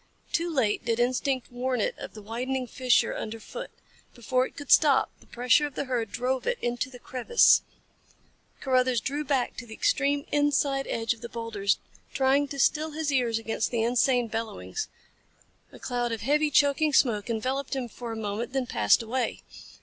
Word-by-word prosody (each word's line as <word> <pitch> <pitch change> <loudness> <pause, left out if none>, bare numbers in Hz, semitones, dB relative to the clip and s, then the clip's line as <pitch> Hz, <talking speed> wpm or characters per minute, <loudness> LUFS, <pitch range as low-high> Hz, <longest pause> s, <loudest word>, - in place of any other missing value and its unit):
Too 340 +1 0
late 255 -10 0
did 230 0 0
instinct 255 +1 0
warn 250 0 -1
it - - 0
of - - -8
the 215 - -10
widening 250 +4 -3
fissure 250 -2 +2
underfoot. 225 - -6 0.5
Before 255 +2 0
it - - -19
could 290 -2 -6
stop 285 -4 +5
the - - -21
pressure 250 +5 +3
of 285 - -13
the - - -1
herd 240 -5 -2
drove 255 +2 -2
it 485 0 +1
into 240 +1 -2
the 255 - -11
crevice. 255 - +4 1.0
Carruthers 255 -2 +2
drew 285 +7 -3
back 265 -3 0
to 245 - -7
the 220 - -9
extreme 285 0 +1
inside 285 -2 +1
edge 225 0 0
of 230 - -17
the 235 - -7
boulders 225 -4 -1 0.4
trying 275 +2 +3
to 280 - -7
still 305 +3 +1
his 310 -1 -1
ears 245 -4 +1
against 225 -1 -2
their 230 -1 0
insane 245 0 +2
bellowings. 225 - -4 0.8
A - - -12
cloud 245 -1 -2
of 225 -2 -3
heavy, 300 +6 +2
choking 290 +2 +3
smoke 230 -5 +2
enveloped 260 +5 -2
him 260 -2 -3
for 235 +1 -7
a - - -4
moment 220 +3 -4
then 265 -2 0
passed 110 - +3
away. 245 +3 -2
255 Hz, 180 wpm, -27 LUFS, 230-275 Hz, 1.0 s, stop